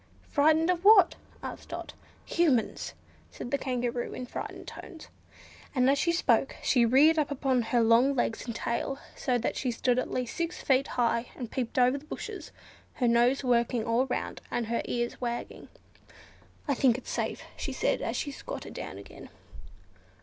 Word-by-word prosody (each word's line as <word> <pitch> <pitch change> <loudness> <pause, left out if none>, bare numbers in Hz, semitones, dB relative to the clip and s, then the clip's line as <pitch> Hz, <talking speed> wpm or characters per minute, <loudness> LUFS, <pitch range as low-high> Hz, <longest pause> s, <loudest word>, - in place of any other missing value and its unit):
"Frightened 315 +3 +4
of 355 0 -2
what?" 405 -3 +7 0.3
asked - - -7
Dot. - - -6 0.3
"Humans!" 290 -10 +1 0.3
said 245 - -8
the 280 - +2
Kangaroo, 245 -2 -2
in 255 - -5
frightened - - -7
tones; 330 -6 -10 0.7
and 255 -1 +3
as 275 +1 +3
she 340 - +2
spoke 270 -6 +2
she 240 -3 +4
reared 300 +7 +5
up 300 - +1
upon 265 -3 +1
her 235 +1 +1
long 235 +5 +4
legs 240 -1 -1
and 235 - -4
tail, 235 +4 -2 0.2
so 250 -2 0
that 240 - -2
she 260 - -1
stood 245 +1 +1
at - - -3
least 250 -2 -3
six 335 0 -2
feet 270 0 +3
high, 235 0 +1
and 240 -3 -6
peeped 250 -2 -3
over 255 +2 +4
the 290 - -18
bushes; 305 - -7 0.4
her 245 - +1
nose 240 +4 +3
working 235 -2 +1
all 235 +3 +2
round, 250 - -3
and 240 - -1
her 235 +1 -1
ears 240 +1 -2
wagging. 240 -1 -4 1.0
"I 285 - +2
think 250 -2 +3
it's 260 - -8
safe," - - -2
she - - -4
said, - - 0
as - - -2
she 285 - -2
squatted - - -7
down 95 - -6
again. 100 - -12
255 Hz, 175 wpm, -29 LUFS, 240-280 Hz, 1.0 s, what